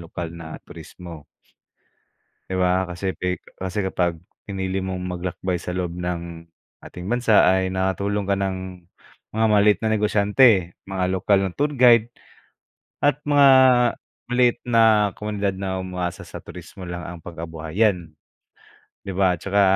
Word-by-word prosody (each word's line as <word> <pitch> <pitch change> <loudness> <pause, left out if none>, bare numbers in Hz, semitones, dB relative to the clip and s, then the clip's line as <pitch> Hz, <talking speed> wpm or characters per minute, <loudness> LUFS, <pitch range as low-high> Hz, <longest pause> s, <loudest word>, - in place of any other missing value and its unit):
lokal 85 0 -6
na 80 -1 -9
turismo. 85 -4 -11 1.2
Di 95 - -4
ba 90 +1 +2
kasi 90 +2 -4
pi 90 0 -2 0.2
kasi 95 +3 -3
kapag 90 -4 -1 0.2
pinili 95 -1 -3
mong 95 -1 -3
maglakbay 90 0 -3
sa 90 +1 -6
loob 90 -1 -3
ng 85 -1 -5 0.4
ating 90 +2 -8
bansa 120 -3 +4
ay 95 0 +1
nakatulong 100 +2 -1
ka 100 - +2
ng 95 -2 -4 0.5
mga 110 +1 +2
maliit 105 -2 +4
na 110 - 0
negosyante, 105 -2 +3
mga 95 -1 -2
lokal 95 +1 +2
na 95 - -1
tour 145 +1 0
guide 120 -3 +5 0.9
at 145 -1 +3
mga 145 -1 +6 0.8
maliit 125 -1 +3
na 110 -3 +4
komunidad 100 -2 -3
na 95 -1 -3
umaasa 90 -1 -4
sa - - -9
turismo 90 -2 -11
lang 90 0 -6
ang 85 -1 -8
pangkabuhayan, 85 +3 -2 1.0
di 95 - -4
ba, 95 -1 +3
tsaka 100 +1 +1
95 Hz, 135 wpm, -22 LUFS, 90-105 Hz, 1.2 s, mga